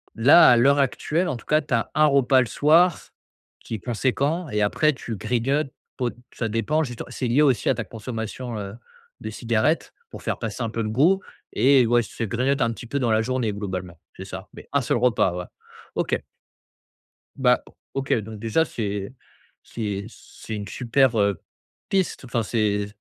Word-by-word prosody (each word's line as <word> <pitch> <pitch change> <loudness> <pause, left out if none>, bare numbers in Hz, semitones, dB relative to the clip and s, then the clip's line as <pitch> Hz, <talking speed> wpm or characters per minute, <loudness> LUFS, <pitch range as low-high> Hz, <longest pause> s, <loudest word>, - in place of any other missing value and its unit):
là, 140 +9 +7
à 120 - +6
l'heure 140 +4 +4
actuelle, 155 +6 0
en - - -1
tout 115 - -15
cas, 155 +1 +3
tu 140 - -5
as 115 -2 0
un 155 0 +5
repas 135 -2 +4
le 120 - 0
soir 160 - +3 0.5
qui 115 - -5
est - - -6
conséquent 140 - -1
et 105 0 -1
après 150 +9 +2
tu 115 -4 -6
grignotes 135 +6 0 0.3
po 125 -2 0 0.3
ça 115 -2 -2
dépend 115 +9 0
justement, 120 -4 -6
c'est 125 - -3
lié 125 +6 +3
aussi 135 -5 +3
à - - +3
ta - - -3
consommation, 115 +1 -6
heu, 100 -1 -6 0.5
de - - -5
cigarettes - - 0 0.2
pour - - -10
faire - - -2
passer 115 +1 -4
un 115 - -2
peu 115 +1 -3
le 110 - -2
goût 165 - +3 0.3
et 135 -1 +5
ouais, 120 0 +3
se 115 - -6
grignote 130 +6 0
un 115 - +2
petit 120 - -10
peu 140 +3 -2
dans 120 -3 +1
la 110 0 +3
journée 125 -2 -1
globalement, 95 -5 -5 0.2
c'est 95 - -7
ça? 95 0 -8
Mais - - -12
1 140 - +3
seul 120 - 0
repas, 115 -7 +2
ouais, 90 0 -4 0.5
OK. - - -1 1.1
Bah, 125 -2 +3 0.3
OK, 135 0 -2
donc 110 -1 -4
déjà, 115 +9 +1
c'est 100 -4 -4 0.5
c'est 100 -3 -4
c'est 110 - -10
une 105 - -5
super, 125 -1 +2
heu, 100 -1 +1 0.5
piste, 190 -8 0
enfin, 120 -2 -1
c'est 105 -2 0
120 Hz, 190 wpm, -24 LUFS, 110-140 Hz, 1.1 s, là